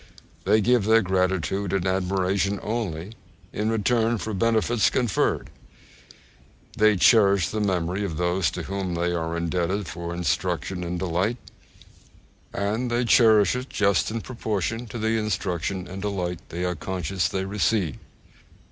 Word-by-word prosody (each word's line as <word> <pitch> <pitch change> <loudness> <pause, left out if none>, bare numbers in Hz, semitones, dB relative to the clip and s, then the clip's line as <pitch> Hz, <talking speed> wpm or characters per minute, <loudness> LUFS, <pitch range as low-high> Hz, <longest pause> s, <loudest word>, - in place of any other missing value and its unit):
They 110 - +4
give 120 -1 +3
their 110 +1 +5
gratitude 95 +1 0
and 95 -2 0
admiration 95 +1 0
only 105 -4 -3 0.4
in 105 +1 -1
return 115 +1 +1
for 110 +1 -4
benefits 115 +2 +2
conferred. 120 -8 0 1.2
They 110 -1 +4
cherish 100 -3 +5
the 110 - -2
memory 95 -1 0
of 85 -6 -3
those 90 -1 +1
to - - -3
whom 95 -2 -3
they 85 +1 0
are 85 0 -2
indebted 90 +3 -1
for 85 0 -5
instruction 90 0 -1
and 90 +1 -3
delight; 95 +6 -1 1.1
and 110 +5 -1
they 120 +1 0
cherish 110 -4 +5
it 125 +2 -5
just 100 -7 +1
in 115 +1 -3
proportion 115 -1 -3
to 110 - -7
the 110 0 0
instruction 95 -3 -2
and 95 +1 -7
delight 90 -4 -2
they 90 +2 -3
are 90 - 0
conscious 90 +2 -2
they 95 0 -3
receive. 95 - 0
95 Hz, 140 wpm, -25 LUFS, 90-110 Hz, 1.2 s, their